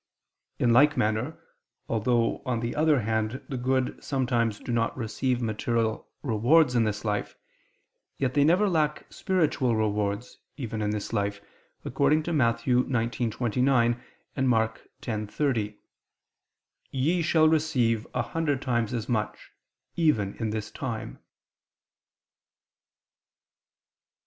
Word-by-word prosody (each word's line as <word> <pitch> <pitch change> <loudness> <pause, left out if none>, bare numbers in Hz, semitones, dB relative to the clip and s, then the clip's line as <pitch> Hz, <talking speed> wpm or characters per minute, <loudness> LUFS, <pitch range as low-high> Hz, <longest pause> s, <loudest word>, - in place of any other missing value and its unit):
In 120 -2 +3
like 145 +4 +5
manner, 110 +8 0 0.5
although, 115 +1 +1
on 125 -4 -1
the 115 0 -3
other 150 -3 +3
hand, 110 +3 -1
the 135 - -3
good 130 +1 -1
sometimes 120 -5 0
do - - -6
not 115 +1 0
receive 125 +1 -1
material 110 0 -1
rewards 125 +4 +4
in 115 -2 +3
this 105 0 -3
life, 105 -1 -2 0.8
yet 130 -2 0
they 145 - +4
never 180 +7 +4
lack 155 -5 0
spiritual 150 -10 +1
rewards, 105 +1 -1 0.2
even 115 -6 -4
in 105 - 0
this 105 -1 -3
life, 100 0 -1 0.5
according 145 +4 +2
to 170 - -2
Matt. 115 -5 +2
19:29, 120 0 +1 0.3
and 135 -1 +1
Mk. 115 -2 +1 0.2
10:30: 110 0 -2 1.1
"Ye 155 +7 +1
shall 160 -1 +4
receive 130 -8 +1
a 125 - +1
hundred 150 0 -1
times 120 -3 -1
as 115 -1 -3
much" 110 -4 -3 0.4
even 110 - +2
"in 115 -2 -2
this 105 -1 -4
time." 120 -5 -5
120 Hz, 120 wpm, -27 LUFS, 110-140 Hz, 1.1 s, like